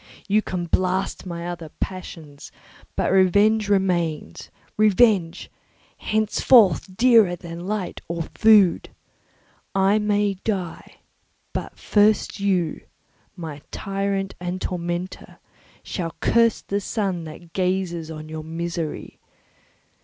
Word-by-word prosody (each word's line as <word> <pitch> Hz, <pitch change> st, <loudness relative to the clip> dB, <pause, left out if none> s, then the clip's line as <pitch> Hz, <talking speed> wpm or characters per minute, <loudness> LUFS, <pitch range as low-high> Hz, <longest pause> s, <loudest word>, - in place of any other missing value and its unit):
You 210 Hz, +2 st, +3 dB
can 180 Hz, -4 st, -4 dB
blast 185 Hz, +2 st, -1 dB
my 170 Hz, -1 st, -5 dB
other 170 Hz, -2 st, -6 dB
passions, 160 Hz, -6 st, -7 dB, 0.4 s
but -, -, 0 dB
revenge 205 Hz, +3 st, +4 dB
remains—revenge, 190 Hz, -, +1 dB, 0.5 s
henceforth 210 Hz, -, +3 dB
dearer 230 Hz, -7 st, +5 dB
than 170 Hz, +1 st, -8 dB
light 205 Hz, -4 st, -3 dB
or 170 Hz, 0 st, -3 dB
food! 210 Hz, -5 st, +5 dB, 0.9 s
I 195 Hz, +2 st, +3 dB
may 205 Hz, -1 st, +1 dB
die, 185 Hz, -6 st, -4 dB, 0.5 s
but -, -, -5 dB
first 210 Hz, 0 st, +2 dB
you, 185 Hz, -5 st, 0 dB, 0.5 s
my 160 Hz, -5 st, -7 dB
tyrant 195 Hz, -1 st, -2 dB
and 180 Hz, +1 st, -4 dB
tormentor, 175 Hz, 0 st, -4 dB, 0.5 s
shall 165 Hz, -4 st, -4 dB
curse 230 Hz, -1 st, +3 dB
the 200 Hz, +1 st, -2 dB
sun 190 Hz, -5 st, -2 dB
that 165 Hz, +2 st, -11 dB
gazes 180 Hz, -3 st, -1 dB
on 155 Hz, -1 st, -8 dB
your 155 Hz, 0 st, -6 dB
misery. 165 Hz, 0 st, -5 dB
185 Hz, 100 wpm, -23 LUFS, 170-205 Hz, 0.9 s, dearer